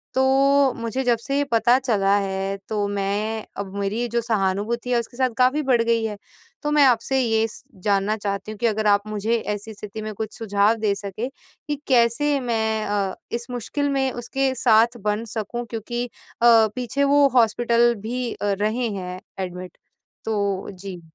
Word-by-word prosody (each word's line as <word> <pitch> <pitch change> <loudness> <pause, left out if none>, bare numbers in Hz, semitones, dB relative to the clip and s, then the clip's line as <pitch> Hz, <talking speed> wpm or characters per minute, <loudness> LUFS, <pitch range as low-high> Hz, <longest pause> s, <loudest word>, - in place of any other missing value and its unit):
तो 270 +1 +4
मुझे 230 +3 -2
जब 240 -2 +3
से 275 +4 -2
ये 285 - +2
पता 235 +2 +4
चला 205 -6 +2
है 195 0 -2
तो 210 -2 0
मैं 205 +2 -2
अब 200 -1 -5
मेरी 210 +5 -1
जो 235 +1 0
सहानुभूति 220 +2 -1
है 240 - +3
उसके 235 +1 -8
साथ 260 -1 +2
काफ़ी 255 +4 +3
बढ़ 240 -3 +4
गई 230 -1 +1
है, 210 -2 -4 0.5
तो 295 - 0
मैं 295 -1 +5
आपसे 260 +1 +2
ये 225 -2 +2
स - - -13 0.2
जानना 205 +1 +2
चाहती 200 0 -3
हूँ 215 - -8
कि 240 - 0
अगर 215 -1 0
आप 205 0 +3
मुझे 215 +2 0 0.2
ऐसी 215 +2 -9
स्थिति 210 +1 -7
में 215 0 -5
कुछ 215 +1 -6
सुझाव 205 0 +2
दे 215 -2 +1
सकें 200 +4 -5 0.4
कि 295 - -1
कैसे 265 +3 +3
मैं 220 -3 0
अ, 200 -2 -1 0.2
इस 235 0 -4
मुश्किल 285 +4 -2
में 270 -1 +1
उसके 260 +3 -1
साथ 235 0 +4
बन 210 +2 -1
सकूँ 235 +3 -3
क्योंकि 240 +2 -3
अ, 245 - -12 0.6
पीछे 255 +3 -1
वो 280 0 +5
हॉस्पिटल 235 0 +4
भी 245 +2 -3
अ, 205 -1 -1
रहे 230 +3 0
हैं 185 -3 -5 0.2
एडमिट 180 0 -7 0.5
तो 200 -3 -1
जी। 185 -2 -8
225 Hz, 180 wpm, -23 LUFS, 205-245 Hz, 0.6 s, मैं